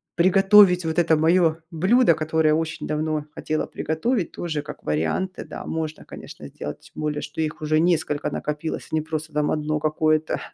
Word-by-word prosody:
приготовить 190 0 +6
вот 160 +1 -2
это 165 -1 +4
мое 165 0 +3
блюдо, 185 +3 +4
которое 155 0 +1
очень 160 0 -3
давно 155 0 -1
хотела 155 0 -2
приготовить, 175 - -2
тоже, 155 -4 -3
как - - -10
варианты, 80 - -2
да - - -8
можно, 160 -1 -4
конечно, - - -10
сделать. - - -7
Тем - - -7
более 150 -1 -1
что 150 +2 -8
их 155 0 -3
уже 155 0 +2
несколько 160 -3 0
накопилось, 150 +2 -4
а - - 0
не 155 - +1
просто, 155 0 -5
там, 150 0 +1
1 - - +1
одно 155 0 -1
какое-то. 155 0 +1
160 Hz, 175 wpm, -23 LUFS, 155-170 Hz, -, приготовить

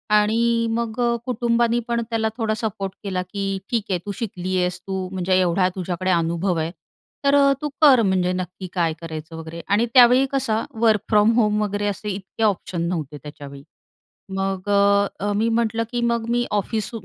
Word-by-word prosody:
आणि 230 +2 +2
मग, 230 0 -2
अ, 235 0 +2
कुटुंबानी 235 -1 +1
पण 235 0 0
त्याला 220 -1 0
थोडा 220 -2 0
सपोर्ट 200 -3 -3
केला, 185 -2 -2
की 195 -1 -2
ठीक 230 -4 0
आहे, 180 -2 0
तू 205 - -3
शिकली 185 -4 -3
आहेस, 180 0 -1
तू 190 -1 -3
म्हणजे 185 0 0
एवढा 180 +1 +2
तुझ्याकडे 185 0 -2
अनुभव 170 +1 0
आहे, 160 +1 -2 0.5
तर 280 +1 +5 0.2
तू 295 - -2
कर. 270 -6 +7
म्हणजे 185 -2 +1
नक्की 185 +1 -5
काय 170 -3 +1
करायचं 160 0 -7
वगैरे. 165 +1 -7
आणि 210 +4 +2
त्यावेळी 250 +1 +7
कसं, 230 -5 0 0.2
वर्क 220 -3 +4
फ्रॉम 210 +1 +5
होम 210 -1 +2
वगैरे 205 0 -2
असे 205 +1 -3
इतके 195 +3 -5
ऑप्शन 185 -4 0
नव्हते 155 -4 -4
त्याच्यावेळी. 140 -2 -10 0.7
मग, 195 0 -2 0.5
अ, 205 +1 -1
मी 225 +2 +1
म्हटलं, 230 0 +1
की 240 - -1
मग 235 -1 0
मी 240 0 +1
ऑफिस, 210 +1 -1
205 Hz, 170 wpm, -22 LUFS, 180-230 Hz, 0.7 s, कर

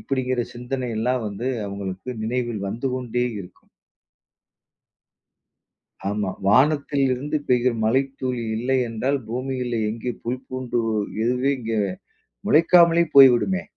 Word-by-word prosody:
இப்பிடிங்கிற 130 -2 -1
சிந்தனை 125 +2 -4
எல்லாம் 125 +3 0
வந்து 105 +5 -4 0.2
அவுங்களுக்கு 100 +1 -6
நினைவில் 120 -1 -2
வந்து 120 +6 -3
கொண்டே 125 -1 -2 0.2
இருக்கும். 90 -2 -14 2.4
ஆமா. 100 -2 -1 0.2
வானத்தில் 140 +5 +3
இருந்து 145 +5 -2
பெய்கிற 125 0 +3
மழைத்துளி 130 +1 0
இல்லை 130 +3 0
என்றால், 130 +5 -1
பூமியிலே 125 -1 -2
எங்கே 115 +2 -4
புல் 125 +2 -3
பூண்டு 130 -2 -2 0.4
எதுவுமே 125 +3 +1
இங்கே 115 -2 -2 0.7
முளைக்காமலே 170 +1 +5
போய்விடுமே! 135 +8 +6
125 Hz, 105 wpm, -23 LUFS, 115-135 Hz, 2.4 s, போய்விடுமே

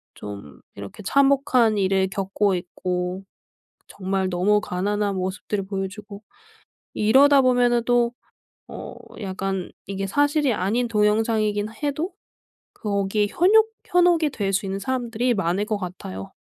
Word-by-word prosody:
좀 100 -9 -9 0.2
이렇게 100 - -9
참혹한 270 -3 +3
일을 190 -1 +2
겪고 195 +1 0
있고 180 +1 -3 0.6
정말 190 -1 -2
너무 195 +4 +2
가난한 205 +2 -1
모습들을 190 +2 -3
보여주고 200 +1 -6 0.7
이러다 275 +6 +5
보면은 245 -2 +3
또 240 -1 +2 0.5
어 - - -8 0.3
약간 190 -2 -3 0.2
이게 195 0 -3
사실이 290 +3 +2
아닌 225 +6 0
동영상이긴 215 -1 +1
해도 300 +6 -2 0.6
거기에 205 0 -1
현욕 435 - +4 0.2
현혹이 350 -3 +3
될 200 -7 -2
수 195 - 0
있는 195 0 -3
사람들이 245 +1 -1
많을 195 -1 0
것 215 -1 -1
같아요. 175 - -7
205 Hz, 270 characters per minute, -23 LUFS, 190-245 Hz, 0.7 s, 이러다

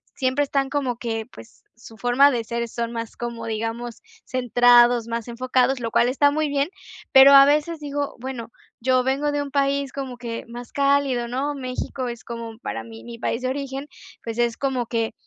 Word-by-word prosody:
siempre 260 +1 +1
están 275 -1 -1
como 270 -5 -1
que 225 -1 -4
pues, 115 - -15
su 230 0 -14
forma 245 +6 +4
de 240 -3 -1
ser 235 +1 -3
son 235 0 -3
más 230 -1 -6
como, 235 -1 -5
digamos 225 +1 -4 0.2
centrados, 245 -1 +4
más 230 0 -4
enfocados, 255 +2 +1
lo 230 -2 -4
cual 240 - +3
está 285 +2 +3
muy 305 0 0
bien, 285 +3 0 0.4
pero 270 +1 +9
a 275 0 +10
veces 300 +3 +1
digo, 285 -1 -3
bueno, 245 -3 -6 0.3
yo 255 +1 +2
vengo 275 +3 0
de 290 0 -1
un 280 - -8
país 280 -1 0
como 265 -3 -5
que 235 -2 -5
más 240 0 -9
cálido, 275 -4 +1
¿no?, 270 +4 -2
México 255 0 -4
es 235 -1 -8
como 230 -1 -7
para - - -5
mí 225 -1 -12
mi 235 -1 -9
país 245 - -2
de 255 - 0
origen. 275 +1 -4 0.4
Pues, 230 0 -5
es 235 -1 +1
como 260 -4 -1
que 230 -1 -1
250 Hz, 195 wpm, -23 LUFS, 235-275 Hz, 0.4 s, a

